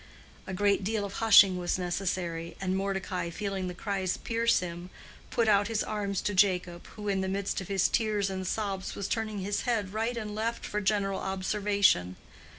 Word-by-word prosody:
A 190 Hz, -, -4 dB
great 200 Hz, +1 st, +2 dB
deal 210 Hz, +1 st, -1 dB
of 200 Hz, -, -7 dB
hushing 200 Hz, -4 st, +7 dB
was 175 Hz, +1 st, 0 dB
necessary, 175 Hz, -2 st, -3 dB
and 190 Hz, -1 st, -1 dB
Mordecai 190 Hz, -2 st, -2 dB
feeling 195 Hz, 0 st, -3 dB
the 180 Hz, -, -5 dB
cries 190 Hz, -2 st, -2 dB
pierce 230 Hz, 0 st, +1 dB
him, 175 Hz, 0 st, -6 dB, 0.4 s
put 230 Hz, -1 st, +1 dB
out 205 Hz, -1 st, +4 dB
his 225 Hz, -1 st, 0 dB
arms 200 Hz, -2 st, -2 dB
to 205 Hz, -, -1 dB
Jacob, 180 Hz, -3 st, +1 dB
who 210 Hz, -1 st, -7 dB
in 195 Hz, -1 st, +1 dB
the 190 Hz, -, -1 dB
midst 195 Hz, 0 st, -2 dB
of 185 Hz, -, -8 dB
his 195 Hz, -2 st, +2 dB
tears 210 Hz, -4 st, 0 dB
and 190 Hz, -1 st, -4 dB
sobs 195 Hz, -2 st, -2 dB
was 200 Hz, -, -3 dB
turning 215 Hz, -3 st, -2 dB
his 200 Hz, +2 st, -1 dB
head 215 Hz, -6 st, -1 dB
right 225 Hz, +3 st, -1 dB
and 210 Hz, -2 st, -4 dB
left 225 Hz, +2 st, -2 dB
for 210 Hz, -, -2 dB
general 195 Hz, -1 st, +1 dB
observation. 195 Hz, -, +1 dB
195 Hz, 185 wpm, -29 LUFS, 185-210 Hz, 0.4 s, hushing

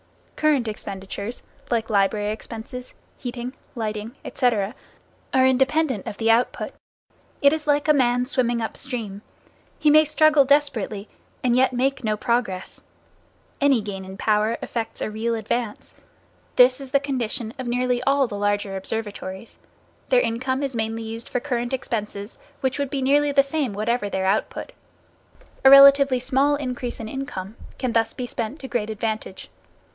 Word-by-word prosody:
Current 295 Hz, -6 st, +2 dB
expenditures, 200 Hz, +1 st, -6 dB, 0.3 s
like 225 Hz, -2 st, -1 dB
library 205 Hz, +1 st, +2 dB
expenses, 230 Hz, +3 st, -8 dB, 0.2 s
heating, 245 Hz, 0 st, -5 dB, 0.2 s
lighting, 215 Hz, +1 st, -4 dB
etc., 225 Hz, -5 st, 0 dB, 0.6 s
are 260 Hz, 0 st, +5 dB
independent 265 Hz, -2 st, +2 dB
of 205 Hz, -, -5 dB
the 225 Hz, 0 st, +3 dB
output. 235 Hz, +2 st, +1 dB, 0.7 s
It 280 Hz, +1 st, +7 dB
is 315 Hz, -1 st, -4 dB
like 290 Hz, +1 st, +2 dB
a 305 Hz, -, +6 dB
man 250 Hz, -3 st, +2 dB
swimming 245 Hz, -3 st, 0 dB
up 225 Hz, -, -3 dB
stream. 225 Hz, -7 st, -4 dB, 0.6 s
He 300 Hz, -, +4 dB
may 310 Hz, +1 st, +7 dB
struggle 305 Hz, -1 st, +4 dB
desperately, 265 Hz, -8 st, +1 dB, 0.4 s
and 245 Hz, -1 st, +3 dB
yet 255 Hz, 0 st, +3 dB
make 270 Hz, +2 st, 0 dB
no 215 Hz, -1 st, 0 dB
progress. 220 Hz, -6 st, -2 dB, 0.8 s
Any 280 Hz, -3 st, +4 dB
gain 200 Hz, -2 st, -6 dB
in 190 Hz, 0 st, -9 dB
power 215 Hz, +2 st, +1 dB
effects 225 Hz, -1 st, -4 dB
a -, -, -2 dB
real 230 Hz, +2 st, -1 dB
advance. 225 Hz, 0 st, -3 dB, 0.6 s
This 255 Hz, +2 st, +5 dB
is 270 Hz, -, -8 dB
the 280 Hz, -, +3 dB
condition 240 Hz, -5 st, -3 dB
of 255 Hz, -, -4 dB
nearly 245 Hz, 0 st, 0 dB
all 275 Hz, +1 st, +3 dB
the 205 Hz, -4 st, -5 dB
larger 205 Hz, -1 st, 0 dB
observatories. 200 Hz, 0 st, -5 dB, 0.5 s
Their -, -, +5 dB
income 260 Hz, -, -1 dB
is 270 Hz, -3 st, -3 dB
mainly 225 Hz, 0 st, -2 dB
used 225 Hz, +1 st, -6 dB
for 250 Hz, -, -1 dB
current 240 Hz, -2 st, -2 dB
expenses, 210 Hz, -4 st, -4 dB, 0.2 s
which 265 Hz, +1 st, -1 dB
would 280 Hz, -2 st, -1 dB
be 275 Hz, -1 st, -2 dB
nearly 290 Hz, +2 st, +3 dB
the 275 Hz, -1 st, +5 dB
same 275 Hz, -5 st, -2 dB
whatever 215 Hz, +1 st, -1 dB
their 190 Hz, -1 st, -1 dB
output. 195 Hz, +3 st, -1 dB, 0.9 s
A 265 Hz, -, +9 dB
relatively 275 Hz, -1 st, +8 dB
small 265 Hz, +3 st, +2 dB
increase 250 Hz, -3 st, -4 dB
in 225 Hz, -, -5 dB
income 225 Hz, -6 st, -6 dB, 0.2 s
can 255 Hz, -2 st, -1 dB
thus 225 Hz, -1 st, +1 dB
be 250 Hz, -, -4 dB
spent 240 Hz, +4 st, -4 dB
to 265 Hz, -, -6 dB
great 240 Hz, -4 st, -2 dB
advantage. 215 Hz, -3 st, -4 dB
240 Hz, 155 wpm, -23 LUFS, 215-270 Hz, 0.9 s, A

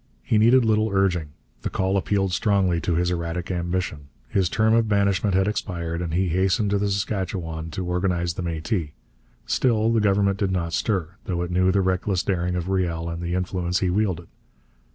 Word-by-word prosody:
He 110 Hz, -, +2 dB
needed 120 Hz, +3 st, +5 dB
little 110 Hz, 0 st, +2 dB
urging. 95 Hz, -5 st, +1 dB, 0.3 s
The -, -, -2 dB
call 95 Hz, +1 st, 0 dB
appealed 95 Hz, -1 st, 0 dB
strongly 95 Hz, -4 st, +2 dB
to 85 Hz, -, 0 dB
his 90 Hz, +1 st, +1 dB
erratic 85 Hz, +1 st, -3 dB
ambition. 85 Hz, -4 st, -3 dB, 0.2 s
His 95 Hz, -3 st, +1 dB
term 110 Hz, +3 st, +2 dB
of 115 Hz, -1 st, +3 dB
banishment 100 Hz, -1 st, +2 dB
had 95 Hz, +1 st, +3 dB
expired, 85 Hz, -5 st, -3 dB
and 85 Hz, -2 st, -3 dB
he 95 Hz, 0 st, +1 dB
hastened 95 Hz, +4 st, +1 dB
to 100 Hz, -, +2 dB
the 100 Hz, 0 st, 0 dB
Saskatchewan 90 Hz, -5 st, -3 dB
to 90 Hz, +3 st, -4 dB
organize 90 Hz, -1 st, 0 dB
the 90 Hz, -, -5 dB
Métis. 80 Hz, -1 st, -2 dB, 0.5 s
Still 115 Hz, -3 st, +2 dB
the 115 Hz, -, +3 dB
Government 100 Hz, -1 st, +2 dB
did 100 Hz, -, +1 dB
not 85 Hz, -3 st, -2 dB
stir, 90 Hz, -4 st, 0 dB, 0.2 s
though 85 Hz, -2 st, -1 dB
it 90 Hz, -, -5 dB
knew 95 Hz, +1 st, +3 dB
the 100 Hz, +1 st, +2 dB
reckless 95 Hz, 0 st, 0 dB
daring 90 Hz, -2 st, -1 dB
of 90 Hz, 0 st, -2 dB
Riel 85 Hz, -3 st, -1 dB
and 85 Hz, 0 st, -5 dB
the 85 Hz, +1 st, -2 dB
influence 90 Hz, 0 st, -1 dB
he 90 Hz, -2 st, +1 dB
wielded. 90 Hz, -4 st, -1 dB
95 Hz, 190 wpm, -24 LUFS, 85-100 Hz, 0.5 s, needed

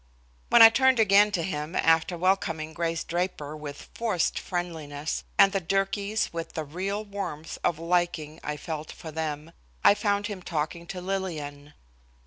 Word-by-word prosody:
When 235 Hz, -, +9 dB
I 225 Hz, -, +12 dB
turned 260 Hz, 0 st, +4 dB
again 205 Hz, -1 st, +6 dB
to 170 Hz, -, 0 dB
him 155 Hz, -1 st, -4 dB
after 165 Hz, +2 st, +3 dB
welcoming 165 Hz, -3 st, 0 dB
Grace 165 Hz, 0 st, -1 dB
Draper 170 Hz, -4 st, -3 dB
with 145 Hz, -2 st, -8 dB
forced 215 Hz, -8 st, 0 dB
friendliness, 160 Hz, -4 st, -4 dB
and 195 Hz, -1 st, +7 dB
the 195 Hz, -1 st, -1 dB
Durkees 195 Hz, +4 st, 0 dB
with 165 Hz, 0 st, -5 dB
the 160 Hz, -, -3 dB
real 195 Hz, +8 st, -3 dB
warmth 185 Hz, -6 st, -6 dB
of 170 Hz, -, +1 dB
liking 165 Hz, -2 st, -1 dB
I 150 Hz, 0 st, -3 dB
felt 155 Hz, 0 st, -5 dB
for 160 Hz, -, -9 dB
them, 155 Hz, 0 st, -4 dB, 0.3 s
I -, -, +8 dB
found 205 Hz, 0 st, 0 dB
him 205 Hz, -3 st, -5 dB
talking 170 Hz, 0 st, -3 dB
to 180 Hz, 0 st, -6 dB
Lillian. 155 Hz, -7 st, -4 dB
170 Hz, 155 wpm, -27 LUFS, 155-195 Hz, 0.3 s, I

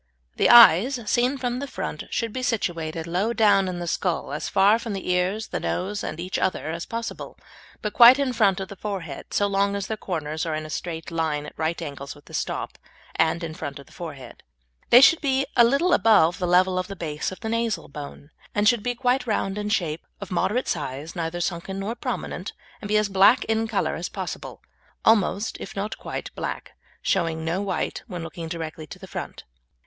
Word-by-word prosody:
The -, -, +4 dB
eyes, 240 Hz, +2 st, +8 dB
seen 250 Hz, +5 st, +1 dB
from 245 Hz, -1 st, -2 dB
the 280 Hz, -, -4 dB
front, -, -, -5 dB
should 230 Hz, -2 st, -2 dB
be 255 Hz, -, -3 dB
situated 165 Hz, -9 st, -2 dB
low 185 Hz, +7 st, 0 dB
down 205 Hz, -4 st, +4 dB
in 180 Hz, -1 st, -3 dB
the 175 Hz, -, -4 dB
skull, 170 Hz, -3 st, -1 dB
as 150 Hz, -, -3 dB
far 205 Hz, +3 st, +4 dB
from 230 Hz, -3 st, -5 dB
the 190 Hz, -2 st, -3 dB
ears, 185 Hz, +5 st, 0 dB
the -, -, -2 dB
nose, 205 Hz, +3 st, -2 dB
and 155 Hz, -, -5 dB
each 180 Hz, +2 st, -3 dB
other 185 Hz, -4 st, -1 dB
as 170 Hz, +1 st, -5 dB
possible, 230 Hz, 0 st, -5 dB, 0.5 s
but 210 Hz, -, -2 dB
quite 240 Hz, +2 st, +9 dB
in 275 Hz, -3 st, 0 dB
front 205 Hz, -5 st, +3 dB
of 190 Hz, -, -5 dB
the 200 Hz, -, -8 dB
forehead, 185 Hz, -8 st, -5 dB
so 205 Hz, -, +2 dB
long 200 Hz, 0 st, +1 dB
as 200 Hz, -1 st, -2 dB
their 220 Hz, +2 st, -4 dB
corners 155 Hz, -5 st, -3 dB
are 160 Hz, -2 st, -2 dB
in 155 Hz, 0 st, -4 dB
a 155 Hz, -, -8 dB
straight 165 Hz, -1 st, -5 dB
line 160 Hz, -3 st, -1 dB
at -, -, -9 dB
right 160 Hz, +1 st, -1 dB
angles 140 Hz, -2 st, -7 dB
with 145 Hz, -, -18 dB
the -, -, -15 dB
stop, -, -, -3 dB, 0.4 s
and 160 Hz, +2 st, +2 dB
in 160 Hz, -1 st, -4 dB
front 140 Hz, -3 st, -6 dB
of 140 Hz, -, -11 dB
the -, -, -21 dB
forehead. 150 Hz, -7 st, -9 dB, 0.5 s
They 245 Hz, -, +9 dB
should 330 Hz, +4 st, +6 dB
be 270 Hz, -2 st, +1 dB
a 235 Hz, -, +7 dB
little 280 Hz, +9 st, +3 dB
above 180 Hz, -7 st, +4 dB
the 180 Hz, -, -1 dB
level 185 Hz, +1 st, +3 dB
of 185 Hz, -, -3 dB
the 195 Hz, -, -7 dB
base 155 Hz, -3 st, -3 dB
of 185 Hz, -, -9 dB
the 220 Hz, -, -3 dB
nasal 230 Hz, -1 st, -1 dB
bone, 145 Hz, +1 st, -9 dB, 0.2 s
and 205 Hz, 0 st, +3 dB
should 235 Hz, 0 st, +4 dB
be 245 Hz, +2 st, -2 dB
quite 250 Hz, 0 st, +1 dB
round 195 Hz, -3 st, 0 dB
in 210 Hz, 0 st, -3 dB
shape, 170 Hz, -7 st, 0 dB, 0.2 s
of 200 Hz, -2 st, -8 dB
moderate 230 Hz, +7 st, 0 dB
size, 150 Hz, 0 st, -4 dB
neither 170 Hz, 0 st, -3 dB
sunken 175 Hz, +2 st, -3 dB
nor 200 Hz, +4 st, -3 dB
prominent, -, -, -4 dB, 0.3 s
and 205 Hz, -, -5 dB
be 210 Hz, +1 st, +2 dB
as 210 Hz, -1 st, +2 dB
black 195 Hz, +5 st, +5 dB
in 225 Hz, 0 st, 0 dB
colour 220 Hz, -, 0 dB
as -, -, -4 dB
possible -, -, -6 dB, 0.4 s
almost, 210 Hz, -1 st, +2 dB
if -, -, -8 dB
not 200 Hz, +2 st, -4 dB
quite, -, -, -6 dB
black, -, -, -5 dB, 0.3 s
showing 165 Hz, -3 st, 0 dB
no 170 Hz, +4 st, -1 dB
white 190 Hz, -5 st, -2 dB
when 180 Hz, -6 st, -6 dB
looking 165 Hz, 0 st, -6 dB
directly 160 Hz, -1 st, -6 dB
to -, -, -9 dB
the -, -, -11 dB
front. -, -, -7 dB
190 Hz, 215 wpm, -24 LUFS, 165-225 Hz, 0.5 s, quite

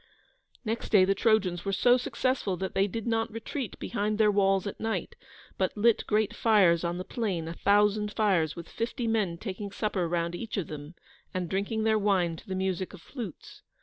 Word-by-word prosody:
Next 225 Hz, +1 st, -2 dB
day 195 Hz, -4 st, +6 dB
the 195 Hz, -, +3 dB
Trojans 195 Hz, -4 st, +2 dB
were 195 Hz, -, -1 dB
so 245 Hz, +5 st, +5 dB
successful 255 Hz, -5 st, -1 dB
that 190 Hz, +1 st, -4 dB
they 195 Hz, +1 st, +2 dB
did 225 Hz, +2 st, -5 dB
not 225 Hz, -1 st, 0 dB
retreat 230 Hz, +2 st, -5 dB
behind 210 Hz, +1 st, -2 dB
their 215 Hz, -1 st, +4 dB
walls 195 Hz, -1 st, +2 dB
at 200 Hz, -, -5 dB
night, 225 Hz, 0 st, -3 dB, 0.4 s
but 190 Hz, +2 st, 0 dB
lit 230 Hz, +1 st, +3 dB
great 215 Hz, +1 st, +1 dB
fires 190 Hz, -7 st, +4 dB
on 170 Hz, 0 st, -1 dB
the 185 Hz, -, -4 dB
plain: 185 Hz, -8 st, -2 dB
a 165 Hz, -, -4 dB
thousand 210 Hz, +2 st, +2 dB
fires, 190 Hz, -8 st, +1 dB
with 170 Hz, -1 st, -8 dB
fifty 235 Hz, +2 st, -3 dB
men 215 Hz, -7 st, 0 dB
taking 200 Hz, +1 st, -5 dB
supper 200 Hz, -4 st, -1 dB
round 170 Hz, 0 st, -1 dB
each 215 Hz, +5 st, -5 dB
of 190 Hz, -, -1 dB
them, 150 Hz, +2 st, -8 dB, 0.4 s
and 180 Hz, -1 st, -1 dB
drinking 205 Hz, +3 st, -1 dB
their 220 Hz, -1 st, +3 dB
wine 190 Hz, -5 st, +2 dB
to 220 Hz, -, -14 dB
the 190 Hz, -, -3 dB
music 190 Hz, 0 st, -2 dB
of -, -, -13 dB
flutes. 230 Hz, -, -8 dB
200 Hz, 195 wpm, -28 LUFS, 185-220 Hz, 0.4 s, day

